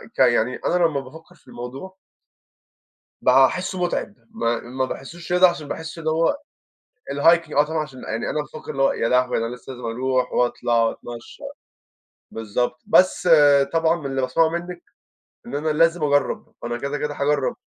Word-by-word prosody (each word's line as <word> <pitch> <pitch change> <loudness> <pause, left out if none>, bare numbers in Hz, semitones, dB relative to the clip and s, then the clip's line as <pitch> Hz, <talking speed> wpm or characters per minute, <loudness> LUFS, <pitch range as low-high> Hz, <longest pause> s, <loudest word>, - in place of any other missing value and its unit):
ك - - -13
يعني 125 +3 +3
أنا 180 0 +2
لمّا 150 -4 0
بافكّر 160 +7 -13
في - - -29
الموضوع 135 +10 -8 1.3
باحسه 135 +8 +3
متعب، 175 +3 -2 0.2
ما 120 - -1
ما 130 +2 -3
باحسوش 165 +7 -7
رياضة، 180 +1 +6
عشان 155 -4 -5
باحس 160 +2 -6
إن 160 -1 -3
هو 165 - +2 0.8
الhiking 165 +4 +3
آه 145 - +6
طبعًا 160 +1 -3
عشان 135 -3 -12
يعني 115 +1 -3
أنا 150 - -1
بافكّر 155 +1 -9
اللي 135 -1 0
هو - - +4
يا 115 - -1
لهوي 125 0 +2
أنا 115 +2 -3
لسّه 130 +2 -10
لازم 125 -1 -9
أروح 125 +2 -1
وأطلع 120 -1 +1
وأتمشى، 115 +1 -6 0.9
بالضبط، 120 +3 -2
بس 185 -1 +3 0.4
طبعًا 165 0 +3
من 150 - -10
اللي 135 -1 -2
باسمعه 160 +6 +2
مِنّك 175 +1 -6 0.6
إن - - -6
أنا 155 +2 -1
لازم 165 +2 +2
أجرّب، 145 -1 0
أنا 120 0 -3
كده 140 +3 -3
كده 150 0 -3
هاجرّب. 140 -1 0
145 Hz, 165 wpm, -22 LUFS, 125-165 Hz, 1.3 s, رياضة